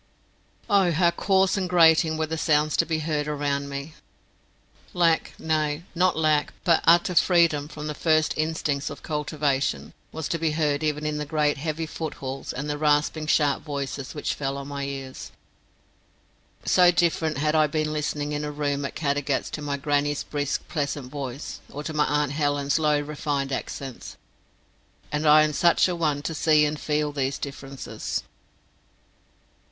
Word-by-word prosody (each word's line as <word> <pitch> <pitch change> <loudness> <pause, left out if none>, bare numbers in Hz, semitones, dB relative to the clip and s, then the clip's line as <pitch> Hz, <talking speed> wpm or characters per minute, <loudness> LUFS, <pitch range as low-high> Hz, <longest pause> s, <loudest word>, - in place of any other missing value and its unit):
Oh, 200 -4 +4
how 170 +1 +3
coarse 190 +2 +2
and 185 -2 -1
grating 160 -2 +5
were 160 - 0
the 160 +1 -4
sounds 155 -1 +2
to - - +2
be 160 -1 0
heard 150 -2 -1
around 140 -1 -1
me! 140 +3 -6 1.0
Lack, 170 -2 +2
nay, 155 0 -1
not 180 0 +2
lack, 155 -2 +2
but 170 -2 +3
utter 170 +2 +5
freedom 170 -5 +3
from 150 0 -8
the 150 - -3
first 155 0 +2
instincts 155 -3 -1
of - - -9
cultivation, 145 - -1 0.2
was 160 -1 -4
to 170 - -1
be 160 -1 0
heard 150 -2 0
even 150 -1 -1
in 150 0 -1
the 150 - -3
great 150 -2 +1
heavy 160 +2 -2
footfalls 140 -4 -5
and 140 +3 -5
the 145 0 -3
rasping 150 +1 +1
sharp 145 -2 +2
voices 140 -1 -5
which 150 - -2
fell 135 -1 -3
on 140 0 -7
my 140 -1 -4
ears. 135 -1 -7 1.3
So 180 -1 +5
different 170 -2 +1
had 150 +1 +1
I 155 -1 +4
been 155 +1 -1
listening 150 -1 -2
in 150 0 -2
a 150 - -3
room 145 -1 -2
at - - -5
Caddagat 145 -2 -1
to 150 - -5
my 145 -1 -2
grannie's 145 +1 0
brisk 145 -1 -3
pleasant 140 -4 -3
voice, 140 -2 -6
or 145 - -7
to 155 - -5
my 150 -1 +2
aunt 150 -1 0
Helen's 145 0 0
low 150 -1 +2
refined 145 -2 -3
accents; 135 -1 -6 0.9
and 150 +1 0
I 155 +1 +8
am 155 0 0
such 170 +5 +4
a 180 - -2
one 150 -4 0
to 165 - -3
see 155 -1 +4
and 150 0 -2
feel 150 0 0
these 135 -1 -1
differences. 135 -1 -5
150 Hz, 170 wpm, -25 LUFS, 145-160 Hz, 1.3 s, I